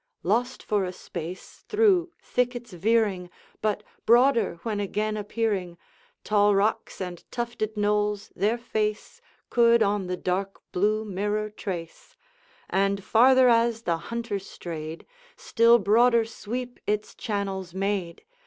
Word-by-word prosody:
Lost 245 +7 0
for 205 -2 0
a 180 - -3
space, 175 0 -8
through 400 -5 +3
thickets 245 -3 -2
veering, 195 -1 +1 0.3
But 210 -1 0 0.2
broader 240 -2 +4
when 215 -3 -2
again 210 +2 -1
appearing, 205 -4 -2 0.5
Tall 205 -1 +3
rocks 205 +3 0
and 180 -2 -6
tufted 235 -3 -3
knolls 210 0 0
their 215 +4 +1
face 215 -2 -3 0.3
Could 235 -1 +5
on 200 -2 0
the 180 0 -2
dark 190 +2 -2
blue 215 +4 +1
mirror 210 +2 -2
trace; 175 -5 -7 0.5
And 195 0 0
farther 255 +4 +5
as 230 -1 +3
the 170 -4 0
Hunter 230 -3 -3
strayed, 165 -4 -7 0.3
Still 230 +1 +4
broader 230 +3 +4
sweep 240 +2 -6
its 210 0 -1
channels 195 -4 -4
made. 190 -3 -2
210 Hz, 125 wpm, -26 LUFS, 195-230 Hz, 0.5 s, Could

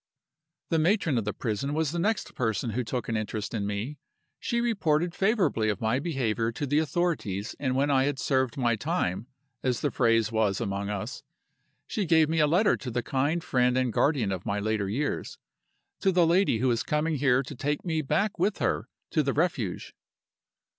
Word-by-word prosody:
"The 165 - +3
matron 165 - +2
of 110 - -4
the 105 - 0
prison 130 +5 -2
was 155 -2 0
the 170 - -2
next 210 +4 -1
person 115 0 -1
who 125 +4 -1
took 120 +2 -3
an 115 - -1
interest 110 -1 -3
in 100 -3 -1
me. 105 +9 -4 0.4
She 235 - -1
reported 175 -8 +1
favorably 185 - +1
of 105 - -1
my 110 +4 +1
behavior 120 -8 -1
to 145 - -3
the 145 +2 +2
authorities 150 - -1
and 130 -2 0
when 140 +2 +2
I 135 -1 +3
had 145 -1 -1
served 130 -3 0
my 120 -3 +2
time 120 - -2 0.3
(as 125 -2 0
the 145 - 0
phrase 115 -3 +2
was 110 -3 +1
among 100 -3 -2
us) 100 -2 -4 0.6
she 205 - -2
gave 160 -2 +4
me 160 0 +1
a 150 - +5
letter 185 +8 +3
to 130 - -6
the 120 0 -2
kind 145 +5 0
friend 125 -1 +2
and 130 -3 +1
guardian 135 -9 +2
of 95 -2 -3
my 100 0 -1
later 105 -1 -1
years 145 +8 -2 0.6
to 195 - +2
the 175 -2 +4
lady 175 - +3
who 125 +2 +2
is 115 - +1
coming 150 +1 0
here 130 -1 +3
to 135 - -8
take 145 +6 -2
me 160 -2 0
back 155 +8 0
with 195 +4 +1
her - - -1 0.2
to 155 - +3
the 135 -2 0
Refuge. 140 - -1
135 Hz, 195 wpm, -27 LUFS, 115-160 Hz, 0.6 s, a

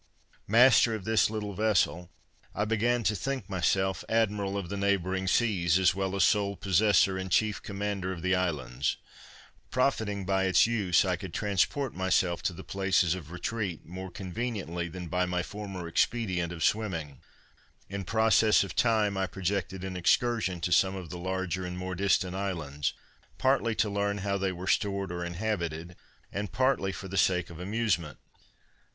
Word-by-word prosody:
Master 120 +1 +6
of 105 - -6
this 110 -2 +3
little 105 -2 -4
vessel, 95 -4 +1 0.5
I 105 - 0
began 115 +2 +1
to 105 - +1
think 130 0 -3
myself 95 0 0
admiral 105 -3 +1
of 100 -3 -4
the 100 - -3
neighboring 95 -1 0
seas, 95 -6 +2
as 95 -1 +4
well 95 0 -2
as 95 - +3
sole 100 0 +2
possessor 100 0 +3
and 95 0 -5
chief 105 +3 +2
commander 100 -2 -3
of 85 -2 -6
the 95 +1 +2
islands. 70 -8 -1 0.7
Profiting 110 -7 0
by 95 0 +1
its 95 -2 +5
use, 100 -6 +2
I 90 -2 0
could 90 -1 -8
transport 105 +7 0
myself 90 -2 +1
to 95 0 -1
the - - -9
places 95 -3 +1
of 85 -5 -7
retreat 90 0 -4
more 95 +2 -7
conveniently 95 -3 -4
than 90 +1 -7
by 90 +2 0
my 90 0 -1
former 100 -3 -6
expedient 90 -2 0
of 80 -2 -4
swimming. 80 - -1 0.7
In 100 0 -5
process 110 +2 +4
of 95 -4 -7
time, 110 -4 +2
I 95 0 0
projected 95 0 -3
an 95 -1 -5
excursion 95 0 +1
to 90 - -1
some 95 +3 +3
of 90 -4 -7
the 90 - -6
larger 95 0 -2
and 90 0 -5
more 90 0 -4
distant 95 -1 +1
islands, 80 -8 -3 0.4
partly 130 -4 +2
to 110 - +2
learn 100 0 -1
how 100 0 0
they 95 -1 0
were 90 0 -7
stored 100 -1 0
or 85 0 -4
inhabited, 85 -2 -3 0.4
and 100 -1 -3
partly 130 -7 +1
for 95 - -7
the 95 +1 -5
sake 90 -2 +2
of 85 - -10
amusement. 95 -7 -1
95 Hz, 170 wpm, -29 LUFS, 90-105 Hz, 0.7 s, Master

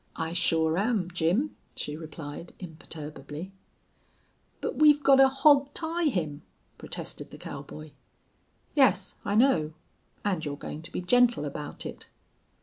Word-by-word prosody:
"I 165 0 -3
sure 160 -1 +2
am, 200 -4 0
Jim," 180 - +1 0.2
she 150 - -4
replied, 155 0 -8
imperturbably. 155 -1 -8 1.1
"But - - -3
we've 295 -1 +6
gotta 270 -1 +7
hawg 275 +1 +4
tie 335 +1 -1
him," 160 - -1 0.4
protested - - -5
the - - -11
cowboy. 155 0 -8 0.8
"Yes, 260 -10 +3
I 200 - -1
know. 190 - +3 0.5
And 185 -6 0
you're 145 -1 -3
going 150 - -7
to 165 - -9
be - - -3
gentle 240 -3 +3
about 145 +1 -5
it." - - -8
180 Hz, 130 wpm, -28 LUFS, -, 1.1 s, gotta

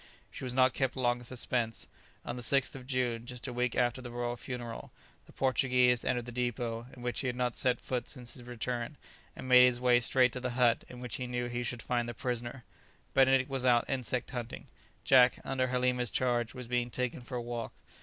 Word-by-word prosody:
She - - -8
was 125 -1 -2
not 130 -1 +5
kept 135 -2 0
long 120 -2 +1
in - - -11
suspense. 120 -2 -2 0.4
On 120 - -3
the 125 - -6
6th 135 +3 +2
of 130 -2 -10
June, 120 -3 -1
just 125 +1 -6
a 125 - -4
week 125 0 0
after 125 0 +1
the 125 - -7
royal 120 0 -3
funeral, 120 -2 -6 0.4
the - - -15
Portuguese 125 -2 +3
entered 120 -2 0
the 120 - -7
depót, 120 0 -3
in 120 - -10
which 120 -1 -1
he 130 - -1
had 125 - -1
not 125 -1 0
set 125 -1 +1
foot 125 -2 -3
since 120 -2 -6
his 125 - -10
return, 120 +3 -4 0.4
and - - -8
made 125 0 +8
his 125 -1 0
way 125 -1 +5
straight 125 +1 +3
to 125 - -4
the 125 0 -2
hut 120 -2 +4
in 125 0 -10
which 125 -2 -2
he 125 - -4
knew 125 0 -2
he 120 0 -3
should 120 -1 -4
find 120 -1 -1
the 120 - -6
prisoner. 120 +1 -3 0.5
Benedict 130 -1 +5
was 135 -2 -1
out 120 -2 +4
insect 125 -2 -1
hunting; 120 -2 -5 0.4
Jack, 125 -2 +6
under 130 -1 0
Halima's 125 -1 +1
charge, 120 0 0
was 125 -2 -7
being 120 0 0
taken 125 0 -2
for 125 +1 -7
a - - -2
walk. 120 -1 -4
125 Hz, 220 wpm, -31 LUFS, 120-125 Hz, 0.5 s, made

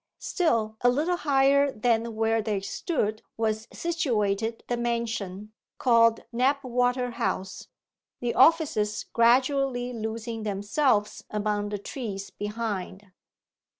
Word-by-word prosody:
Still 230 - 0
a 245 - +5
little 310 +8 +1
higher 280 -1 +3
than 230 -1 0
where 225 0 +1
they 210 -2 -1
stood 215 - -2 0.2
was 220 0 -1
situated 225 - -1
the 245 - 0
mansion, 225 -4 -3 0.2
called 230 -2 +4
Knapwater 250 -1 +1
House, 190 -4 -3 0.5
the 240 -1 -1
offices 260 -9 +3
gradually 250 +1 +2
losing 225 0 -4
themselves 210 +2 0
among 210 -1 -1
the 205 - -3
trees 200 -2 -6
behind. 205 -2 -5
230 Hz, 105 wpm, -27 LUFS, 210-255 Hz, 0.5 s, a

